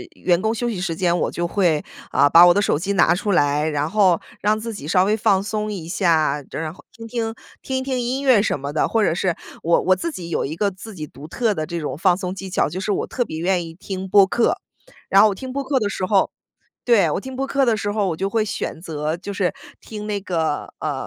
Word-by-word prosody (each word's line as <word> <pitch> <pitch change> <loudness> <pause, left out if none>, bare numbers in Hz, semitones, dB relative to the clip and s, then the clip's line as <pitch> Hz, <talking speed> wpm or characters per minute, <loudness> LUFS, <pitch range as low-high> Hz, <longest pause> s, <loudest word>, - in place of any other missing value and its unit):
员 175 -1 +1
工 220 +2 0
休 240 +1 -1
息 210 -6 -3
时 180 -3 -2
间， 175 0 +1
我 - - 0
就 175 - -3
会， 170 -4 +1 0.3
啊， 145 - +4
把 170 +4 +9
我 175 - +7
的 205 - +2
手 175 - +1
机 200 +4 -1
拿 180 - +4
出 200 +3 -1
来， 145 -1 +2
然 150 0 -1
后 195 -5 +4 0.2
让 210 +2 +2
自 225 +1 -5
己 150 -8 -8
稍 180 +2 +4
微 210 +3 +1
放 195 -2 +2
松 215 0 -3
一 185 -6 -5
下， 160 -5 +1
这 - - -9
然 155 -1 -4
后 - - -18
听 230 - -10
听 225 -1 -3 0.3
听 265 - -3
一 - - -4
听 260 -1 -2
音 255 +3 -2
乐 255 -6 +5
什 215 - 0
么 140 +1 -5
的。 150 - +1
或 225 -1 +1
者 175 - +2
是 175 0 0 0.3
我 170 +1 +3
我 185 - +3
自 335 - -3
己 170 -8 -7
有 - - -1
一 150 - -4
个 200 +3 0
自 195 +3 -11
己 155 -3 -5
独 145 0 -12
特 225 +5 0
的 155 -5 -3
这 170 +1 -4
种 140 -2 -4
放 180 +1 +3
松 185 -1 -4
技 190 0 -7
巧， - - +1
就 185 - -5
是 205 - -2
我 - - -2
特 245 - -1
别 160 - -6
愿 175 0 0
意 165 - -10
听 190 +2 -6
播 200 +1 +6
客。 235 +4 +1 0.5
然 195 - +6
后 215 - +7
我 200 - -3
听 260 +6 -7
播 280 +2 -2
客 275 0 0
的 210 -3 -1
时 190 -1 -2
候 195 0 +3 0.6
对， 225 -8 +4
我 - - -1
听 260 +3 -8
播 270 +1 -1
客 275 0 +1
的 235 -3 +2
时 205 -1 -2
候， 205 -2 0
我 165 - -2
就 195 +4 -1
会 220 +2 +1
选 185 -5 -4
择 155 -1 -3
就 195 +3 -7
是 190 -2 -1 0.3
听 210 -1 -8
那 205 -1 -1
个， 165 -6 -2
呃， 145 -4 -3
190 Hz, 290 characters per minute, -21 LUFS, 165-215 Hz, 0.6 s, 把